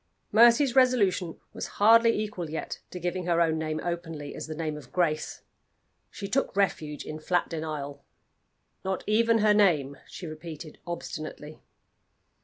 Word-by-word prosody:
Mercy's 235 Hz, +4 st, +6 dB
resolution 205 Hz, -10 st, +3 dB
was -, -, -5 dB
hardly 230 Hz, +3 st, +6 dB
equal 205 Hz, -6 st, -4 dB
yet 160 Hz, -, -5 dB
to 180 Hz, -, -7 dB
giving 180 Hz, +1 st, -3 dB
her 170 Hz, -1 st, +2 dB
own 160 Hz, -2 st, +2 dB
name 155 Hz, 0 st, -2 dB
openly 165 Hz, -4 st, -4 dB
as -, -, -6 dB
the 155 Hz, -, -5 dB
name 155 Hz, -1 st, -3 dB
of 150 Hz, -4 st, -11 dB
Grace. 155 Hz, -4 st, -1 dB, 0.7 s
She 200 Hz, -, -6 dB
took 270 Hz, -2 st, 0 dB
refuge 155 Hz, -7 st, -1 dB
in 155 Hz, -, -6 dB
flat 175 Hz, +3 st, 0 dB
denial. 155 Hz, -3 st, -5 dB, 0.8 s
"Not 190 Hz, 0 st, -2 dB
even 230 Hz, +2 st, +3 dB
her 210 Hz, -, +6 dB
name," 155 Hz, -10 st, +3 dB
she 180 Hz, -, -9 dB
repeated 155 Hz, 0 st, -8 dB
obstinately. 155 Hz, -2 st, -6 dB
170 Hz, 145 wpm, -28 LUFS, 155-205 Hz, 0.8 s, Mercy's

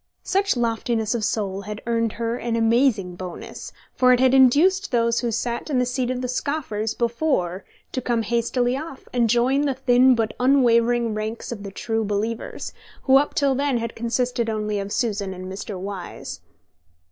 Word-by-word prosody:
Such 395 Hz, -6 st, +1 dB
loftiness 230 Hz, -1 st, 0 dB
of 235 Hz, -2 st, -2 dB
soul 200 Hz, -3 st, -1 dB
had 210 Hz, +1 st, -7 dB
earned 230 Hz, -1 st, 0 dB
her 230 Hz, 0 st, -2 dB
an 235 Hz, -1 st, -2 dB
amazing 225 Hz, -5 st, +2 dB
bonus, 180 Hz, -1 st, -8 dB, 0.2 s
for 255 Hz, 0 st, +4 dB
it 250 Hz, -, +5 dB
had 260 Hz, 0 st, +4 dB
induced 305 Hz, +10 st, +5 dB
those 235 Hz, -1 st, +2 dB
who 240 Hz, -, -1 dB
sat 235 Hz, +5 st, -3 dB
in 280 Hz, -, +1 dB
the 250 Hz, -, +2 dB
seat 250 Hz, 0 st, -1 dB
of 255 Hz, 0 st, -2 dB
the 250 Hz, -, -2 dB
scoffers 250 Hz, -5 st, -2 dB
before 235 Hz, -, 0 dB, 0.3 s
to 255 Hz, -, -2 dB
come 235 Hz, -2 st, 0 dB
hastily 240 Hz, +2 st, 0 dB
off, 285 Hz, -1 st, -7 dB
and 240 Hz, -2 st, +2 dB
join 245 Hz, +4 st, +3 dB
the 280 Hz, -3 st, 0 dB
thin 255 Hz, 0 st, +4 dB
but 225 Hz, -2 st, -1 dB
unwavering 240 Hz, -3 st, +3 dB
ranks 215 Hz, +3 st, -4 dB
of 225 Hz, -4 st, -5 dB
the 200 Hz, -, -6 dB
true 225 Hz, +3 st, -2 dB
believers, 215 Hz, +2 st, -3 dB, 0.3 s
who 265 Hz, 0 st, +6 dB
up 290 Hz, +2 st, 0 dB
till 280 Hz, -2 st, +2 dB
then 275 Hz, -1 st, 0 dB
had 230 Hz, -1 st, -4 dB
consisted 235 Hz, 0 st, -1 dB
only 210 Hz, -1 st, -1 dB
of 200 Hz, 0 st, -5 dB
Susan 205 Hz, -6 st, -1 dB
and 185 Hz, 0 st, -8 dB
Mr. 190 Hz, +1 st, -6 dB
Wyse. 195 Hz, -1 st, -6 dB
235 Hz, 180 wpm, -23 LUFS, 215-255 Hz, 0.3 s, who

